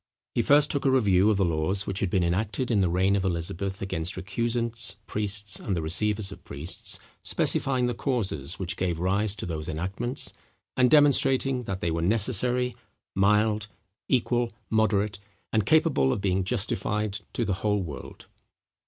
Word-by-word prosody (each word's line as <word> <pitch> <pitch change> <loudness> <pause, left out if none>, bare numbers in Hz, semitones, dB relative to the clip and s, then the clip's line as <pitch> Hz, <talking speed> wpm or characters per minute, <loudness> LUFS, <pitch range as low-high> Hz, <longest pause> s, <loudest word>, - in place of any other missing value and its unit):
He - - +2
first 145 +1 +4
took 140 - -1
a 135 - +3
review 105 -6 +3
of 105 - +2
the 95 - +2
laws 85 +5 -1
which 100 0 -2
had 100 - 0
been 90 0 +1
enacted 100 +8 -1
in 105 -3 +3
the 90 - +2
reign 95 +3 +2
of 100 - 0
Elizabeth 95 +2 -2
against 90 -2 -1
recusants, 115 +3 -2
priests, 105 -1 0
and 100 - -2
the - - -1
receivers 100 +5 +1
of 95 -2 -11
priests, 70 +5 -3 0.2
specifying 130 -2 +1
the 120 - 0
causes 100 - -2
which 90 -2 -3
gave 90 -3 -1
rise 100 +3 0
to - - -5
those 80 -1 -4
enactments, 95 - -1 0.4
and 125 -1 +4
demonstrating 135 -3 +4
that 95 -2 -4
they 85 - 0
were 85 +1 -1
necessary, 120 +5 +2 0.4
mild, 105 +2 +2 0.4
equal, 120 -1 +1 0.2
moderate, 105 -2 +1 0.3
and 110 -2 +1
capable 155 - +3
of - - -1
being 95 -1 0
justified 105 -1 -1
to 120 - -1
the 100 - 0
whole 105 -2 +1
world. 75 -5 -9
100 Hz, 165 wpm, -26 LUFS, 95-120 Hz, 0.4 s, first